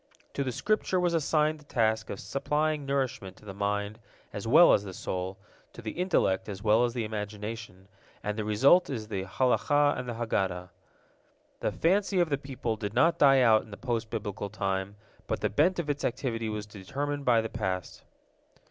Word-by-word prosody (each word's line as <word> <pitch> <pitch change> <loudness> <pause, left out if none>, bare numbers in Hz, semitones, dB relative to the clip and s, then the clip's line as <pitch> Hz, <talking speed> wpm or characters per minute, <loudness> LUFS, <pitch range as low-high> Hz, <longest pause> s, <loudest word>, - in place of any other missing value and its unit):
To 140 - -1
the 130 - -2
Scripture 200 - 0
was 175 -1 +1
assigned 155 -1 +1
the - - -17
task 110 -5 0
of 100 - -5
supplying 150 +6 -1
nourishment 130 -8 -2
to - - -18
the 100 - -7
mind 105 +2 -2 0.3
as 105 +2 -5
well 155 +9 +7
as 100 - +3
the 95 -2 -8
soul, 95 +1 -4 0.4
to - - -10
the 110 - -3
intellect 105 - +1
as 100 -1 -7
well 110 +2 +4
as 120 0 -1
the 120 - -1
imagination, 105 -2 -6 0.4
and 105 0 -2
the 110 - -2
result 135 - +4
is 110 -6 -4
the 95 -3 -3
Halakah 145 +7 +2
and 125 -1 -5
the 120 - -4
Haggadah. 95 -6 -2 0.9
The - - -1
fancy 195 +2 +1
of 175 -2 +2
the 140 - +1
people 130 -5 -4
did 105 0 -5
not 165 +7 +3
die 135 -2 +6
out 110 -3 +5
in - - -16
the 100 - -9
post 115 -3 -2
Biblical 105 -2 -4
time, 95 -1 -2 0.3
but - - -2
the - - 0
bent 165 - +3
of 170 -3 -2
its 145 0 -2
activity 115 -3 -2
was 105 -1 -4
determined 140 +9 -4
by 120 -3 +4
the 110 - -1
past. 95 -5 -4
115 Hz, 195 wpm, -29 LUFS, 105-140 Hz, 0.9 s, well